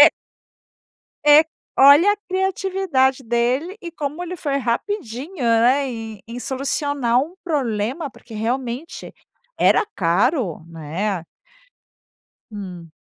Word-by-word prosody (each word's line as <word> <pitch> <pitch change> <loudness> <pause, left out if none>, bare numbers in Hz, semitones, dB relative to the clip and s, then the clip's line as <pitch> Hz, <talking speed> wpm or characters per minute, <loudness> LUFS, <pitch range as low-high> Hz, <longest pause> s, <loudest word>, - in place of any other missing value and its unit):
É - - +10 1.2
É. 295 +1 +8 0.4
Olha 290 +9 +8
a - - -8
criatividade 375 -8 +1
dele 250 - 0
e 340 -2 -7
como 305 +2 -4
ele 360 +1 -5
foi 285 -4 -1
rapidinho, 275 - -3
né, 240 +4 +3
em 225 -3 -7
em 240 +1 -6
solucionar 270 -2 0
um 335 +6 -6
problema. 270 - -1
Porque 230 - -15
realmente 245 +6 -4 0.4
era - - +4
caro, 190 - +1
né. 170 +4 -3 1.3
Hum. 180 -5 -8
260 Hz, 105 wpm, -21 LUFS, 225-315 Hz, 1.3 s, É